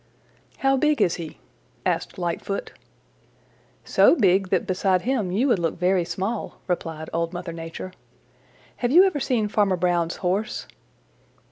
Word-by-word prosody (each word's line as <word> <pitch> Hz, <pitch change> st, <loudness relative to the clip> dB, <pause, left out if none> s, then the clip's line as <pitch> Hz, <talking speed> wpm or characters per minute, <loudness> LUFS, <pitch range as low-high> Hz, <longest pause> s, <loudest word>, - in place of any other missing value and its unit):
"How 270 Hz, 0 st, +2 dB
big 300 Hz, +2 st, +2 dB
is 170 Hz, -, +2 dB
he?" 165 Hz, -3 st, -7 dB, 0.5 s
asked -, -, -1 dB
Lightfoot. 175 Hz, +3 st, -3 dB, 1.1 s
"So -, -, +5 dB
big 190 Hz, -, +3 dB
that -, -, +1 dB
beside 185 Hz, 0 st, +1 dB
him 235 Hz, -7 st, 0 dB
you 225 Hz, +9 st, +2 dB
would 220 Hz, -, +3 dB
look 165 Hz, -2 st, -1 dB
very 180 Hz, 0 st, +2 dB
small," 195 Hz, +6 st, -3 dB
replied 160 Hz, -3 st, -3 dB
Old 170 Hz, +1 st, -1 dB
Mother 175 Hz, -1 st, -5 dB
Nature. 165 Hz, +3 st, -7 dB, 0.8 s
"Have 245 Hz, -, 0 dB
you 350 Hz, +6 st, +8 dB
ever 375 Hz, -7 st, +1 dB
seen 240 Hz, -5 st, 0 dB
Farmer 205 Hz, -2 st, +2 dB
Brown's 175 Hz, -1 st, +1 dB
Horse?" 195 Hz, +4 st, -2 dB
185 Hz, 140 wpm, -24 LUFS, 175-220 Hz, 1.1 s, you